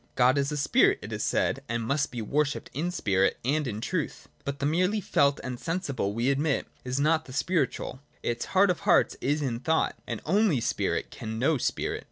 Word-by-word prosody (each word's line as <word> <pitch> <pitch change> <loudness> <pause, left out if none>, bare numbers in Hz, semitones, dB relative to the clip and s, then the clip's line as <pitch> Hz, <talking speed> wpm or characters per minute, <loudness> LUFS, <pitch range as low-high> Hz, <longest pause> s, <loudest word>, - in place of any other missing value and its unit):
God 130 +2 +4
is 140 +1 0
a 150 - -2
spirit, 140 - +4
it - - -6
is - - -2
said, - - +1
and 115 0 -1
must 140 +5 0
be 120 -2 -5
worshipped 145 +6 -1
in 160 +6 -1
spirit 95 - +1
and 145 +2 +1
in 105 -3 -3
truth. - - -3 0.2
But 140 0 -3
the 140 - -2
merely 180 +8 +2
felt 140 -7 +2
and 125 -2 -5
sensible, 155 - -2
we 120 +4 +2
admit, 140 +1 0 0.2
is 130 +2 -2
not 155 +2 +2
the 130 - -10
spiritual; 145 -4 -1 0.2
its 120 0 -1
heart 195 0 +6
of 175 - -3
hearts - - +3
is 145 +2 0
in 120 -4 -2
thought; 160 +5 +1
and - - -3
only 195 - +3
spirit - - -1
can 110 0 -6
know 140 +4 +2
spirit. - - -1
140 Hz, 205 wpm, -28 LUFS, 125-160 Hz, 0.2 s, heart